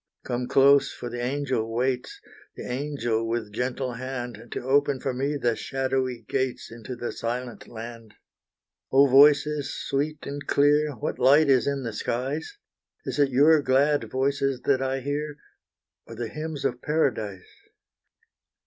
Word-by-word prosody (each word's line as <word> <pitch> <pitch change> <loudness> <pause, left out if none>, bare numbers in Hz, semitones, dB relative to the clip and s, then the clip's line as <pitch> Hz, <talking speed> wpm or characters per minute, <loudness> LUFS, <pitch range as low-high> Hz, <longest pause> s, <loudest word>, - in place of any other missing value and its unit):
Come 125 0 -3
close 140 +1 +5
for 120 - -7
the 120 - -4
angel 130 -4 -1
waits 125 +2 -1 0.4
The - - -8
angel 125 -4 -2
with 115 -3 -3
gentle 125 +2 -2
hand, 120 -2 -6
To - - -5
open 140 +1 +2
for 135 - -2
me 140 +3 -1
the 120 -4 +1
shadowy 130 -2 -2
gates, 130 -3 -2
Into 115 +2 -8
the 120 0 -4
silent 120 +1 -5
land. 115 -1 -9 0.8
Oh, 135 +1 +6
voices 145 +2 +5
sweet 145 +2 -2
and 145 0 -6
clear 145 +1 +3
What 120 - -4
light 140 +4 +5
is 130 0 +3
in 140 -1 -1
the 115 -2 -4
skies? 135 - -3 0.5
Is - - -3
it 140 -1 +4
your 145 +4 +5
glad 145 +2 +2
voices 135 0 0
that 135 -2 +2
I 135 0 -1
hear 145 +2 -3 0.7
Or 115 - -9
the 115 0 -4
hymns 155 -2 -5
of 125 - -1
paradise? 110 -11 -2
130 Hz, 150 wpm, -26 LUFS, 120-145 Hz, 0.8 s, Oh